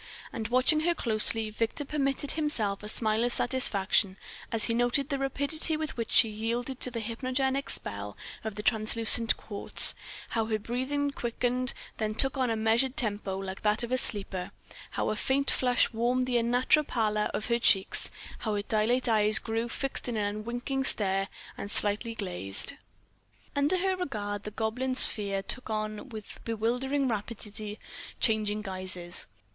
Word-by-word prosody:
And 225 -3 -3
watching 255 +6 +4
her 340 +2 +1
closely, 220 -3 +2
Victor 230 +6 -2
permitted 275 -1 -1
himself 240 -11 0
a 210 - -5
smile 220 0 +1
of 245 - +1
satisfaction 200 -6 +2 0.3
as 225 -1 +1
he 230 - +3
noted 245 +4 +1
the 275 -2 -1
rapidity 285 +4 +2
with 310 -1 -3
which 230 -1 -4
she 285 -5 +7
yielded 235 +4 -3
to - - +1
the 230 -2 -4
hypnogenic 260 +4 -1
spell 100 0 -3 0.3
of 220 -2 -5
the 210 - -6
translucent 225 +1 +3
quartz; 200 -2 +4 0.4
how 225 -2 0
her 220 -1 0
breathing 260 +6 -2
quickened, 250 0 -1 0.2
then 215 -1 -2
took 270 +4 +5
on 260 -2 0
a 225 - 0
measured 225 +4 +1
tempo 205 -4 0
like 195 0 -6
that 210 +2 +1
of 235 - -5
a 255 - +2
sleeper; 195 -5 -2 0.4
how - - -1
a - - -1
faint 265 +5 +1
flush 250 -1 +2
warmed 245 +3 +1
the 245 -1 +1
unnatural 250 +6 +3
pallor 215 -5 0
of 215 - -3
her 235 -1 +1
cheeks, 195 -4 +3 0.3
how 215 -2 -2
her 205 - -2
dilate 225 +5 +1
eyes 215 -1 +4
grew 225 +1 -2
fixed 270 0 -4
in 235 - -2
an 205 0 -1
unwinking 245 +5 -3
stare, 195 -6 +1 0.3
and 200 - -5
slightly 210 +3 0
glassed.... 180 - -4 0.8
Under 285 +6 +2
her 380 +1 0
regard 210 - -4
the - - -3
goblin 230 +5 -2
sphere 200 -5 +5
took 255 +4 -1
on 215 +3 -4
with 215 -3 -9
bewildering 250 +5 -1
rapidity 215 -1 -4 0.4
changing 215 -2 +1
guises. 185 - -3
230 Hz, 160 wpm, -29 LUFS, 210-255 Hz, 0.8 s, she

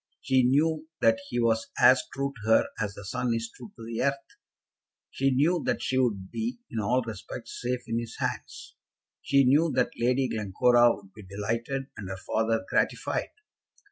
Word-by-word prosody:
She 130 -1 +2
knew 155 +5 +2
that 115 0 +4
he 120 - -1
was 115 -1 +1
as 130 0 +7
true 140 0 -2
to 110 - -4
her 110 - +5
as 100 -2 -2
the 100 - -9
sun 125 +3 -1
is 115 0 -4
true 120 -4 -11
to 115 - -10
the 115 0 -3
earth. 140 +1 +2 1.0
She 135 +1 +1
knew 150 +6 +2
that - - 0
she 130 - +1
would 100 -7 0
be, 235 +3 -3
in 115 - -2
all 125 +5 +1
respects, 110 +1 -8
safe 125 0 -1
in 115 0 -1
his 115 -1 -7
hands. - - -5 0.5
She 140 0 +3
knew 150 +5 +4
that 125 -1 +2
Lady 125 +2 +2
Glencora 120 +3 +3
would 95 -1 -17
be 110 - -12
delighted, 115 +7 -3
and 100 -3 -7
her 95 - -5
father 110 +1 -1
gratified. - - 0
120 Hz, 180 wpm, -27 LUFS, 110-130 Hz, 1.0 s, as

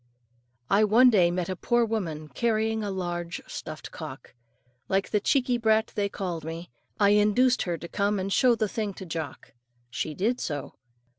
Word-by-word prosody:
I 200 +7 +4
one 235 +4 +6
day 180 -6 +5
met 175 0 -2
a 185 - -3
poor 240 +5 +2
woman 170 -9 -3
carrying 220 +5 0
a 205 - -2
large 175 -3 -3
stuffed - - -7
cock. - - -9 0.6
Like 195 +1 0
the 210 - +3
cheeky 250 +2 +1
brat 220 -1 +2
they 205 -2 0
called 175 -5 -4
me, 165 0 -7 0.3
I 200 -1 +5
induced 210 +5 +4
her 170 - -1
to 170 - -8
come 205 +2 0
and 195 +1 -2
show 250 -2 +4
the 215 -1 0
thing 205 -2 -3
to 190 - -8
Jock. 160 -5 -6 0.4
She 155 +3 -3
did 230 - 0
so. 145 -3 -4
200 Hz, 175 wpm, -27 LUFS, 175-220 Hz, 0.6 s, one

